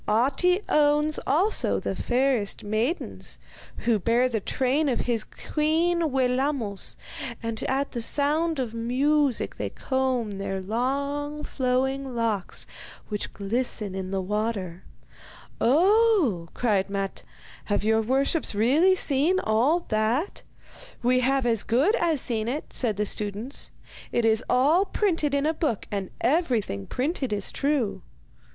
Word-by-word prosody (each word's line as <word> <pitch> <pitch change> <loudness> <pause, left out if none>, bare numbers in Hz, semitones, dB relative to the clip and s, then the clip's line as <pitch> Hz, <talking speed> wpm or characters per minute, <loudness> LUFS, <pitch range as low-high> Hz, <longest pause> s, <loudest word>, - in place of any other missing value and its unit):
Ahti 275 - +2
owns 300 +1 +3
also 360 +10 +2
the - - -3
fairest 250 -4 0
maidens, 220 - -2 0.5
who 230 -3 +3
bear 235 +6 +2
the 230 -3 -1
train 270 +8 0
of 245 - 0
his 230 -3 0
queen 325 +5 0
Wellamos, 255 -5 -1 0.5
and 230 -1 -3
at 275 +2 0
the 240 - -4
sound 300 +6 +1
of 245 -4 -2
music 265 +4 +1
they - - -3
comb 260 -4 -1
their 195 -1 -3
long, 280 +8 -2
flowing 265 0 -1
locks, 225 -5 -2 0.4
which 210 -2 -4
glisten 210 0 -3
in 190 -1 -4
the 190 -1 -2
water.' 200 -3 -2 0.8
'Oh!' 345 - +3
cried 205 -5 +1
Matte, 195 -1 -3 0.4
'have 205 -1 0
your 220 +1 +3
worships 270 +3 0
really 295 - +4
seen 315 +3 +2
all 250 +10 +2
that?' 225 - 0 0.6
'We 250 +1 +3
have 265 +1 +1
as 225 -3 +2
good 270 - +2
as 330 -4 +1
seen 225 -3 -1
it,' 280 +6 -4
said 220 -6 +1
the 210 - 0
students. 210 +6 -2 0.4
'It 240 - +1
is 220 +1 +3
all 290 +9 +4
printed 330 -9 0
in 280 +1 +1
a 315 - +2
book, 300 -9 -1
and 195 -2 -3
everything 235 - 0
printed 270 -2 -2
is 205 -2 -2
true. 275 -7 0
255 Hz, 130 wpm, -26 LUFS, 220-295 Hz, 0.8 s, really